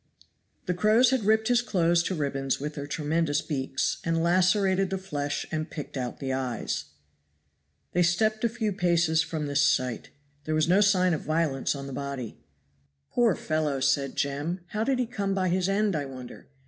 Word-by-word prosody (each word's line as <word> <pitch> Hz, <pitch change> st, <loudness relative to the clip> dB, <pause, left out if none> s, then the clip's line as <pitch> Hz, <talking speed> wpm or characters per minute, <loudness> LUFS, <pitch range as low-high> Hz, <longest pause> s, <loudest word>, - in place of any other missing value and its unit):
The 180 Hz, -, 0 dB
crows 215 Hz, +7 st, +4 dB
had 260 Hz, -6 st, 0 dB
ripped 220 Hz, +1 st, +3 dB
his 245 Hz, -1 st, +4 dB
clothes 175 Hz, -7 st, +2 dB
to 190 Hz, -, -1 dB
ribbons 135 Hz, -3 st, -1 dB
with 150 Hz, +2 st, -4 dB
their 145 Hz, -1 st, -6 dB
tremendous 155 Hz, 0 st, 0 dB
beaks, 135 Hz, -3 st, -1 dB
and 165 Hz, 0 st, 0 dB
lacerated 185 Hz, +2 st, +3 dB
the 190 Hz, -, -2 dB
flesh 145 Hz, -6 st, -3 dB
and 155 Hz, +1 st, -2 dB
picked 150 Hz, -2 st, -7 dB
out 125 Hz, -2 st, -4 dB
the 135 Hz, -1 st, -2 dB
eyes. 130 Hz, -2 st, -2 dB, 1.1 s
They 180 Hz, -, +1 dB
stepped 215 Hz, +6 st, +2 dB
a 235 Hz, -, +3 dB
few 220 Hz, -3 st, -2 dB
paces 170 Hz, -3 st, +2 dB
from 160 Hz, -1 st, -3 dB
this 145 Hz, 0 st, +1 dB
sight. 130 Hz, -4 st, +1 dB, 0.4 s
There 155 Hz, -, -1 dB
was 155 Hz, 0 st, +2 dB
no 185 Hz, +4 st, +4 dB
sign 185 Hz, -3 st, +4 dB
of 155 Hz, -, -2 dB
violence 155 Hz, -4 st, 0 dB
on 140 Hz, 0 st, -6 dB
the 135 Hz, -, -7 dB
body. 140 Hz, -3 st, -5 dB, 0.7 s
"Poor 235 Hz, -5 st, +3 dB
fellow!" 155 Hz, -3 st, -1 dB
said 140 Hz, 0 st, +1 dB
Jem. 145 Hz, +6 st, -2 dB
"How 215 Hz, 0 st, -1 dB
did 265 Hz, +2 st, +1 dB
he 250 Hz, -, +1 dB
come 200 Hz, -4 st, -2 dB
by 185 Hz, -1 st, +1 dB
his 185 Hz, +1 st, +1 dB
end, 200 Hz, -1 st, +1 dB
I 145 Hz, -2 st, -1 dB
wonder?" 130 Hz, -2 st, -10 dB
165 Hz, 185 wpm, -27 LUFS, 140-195 Hz, 1.1 s, crows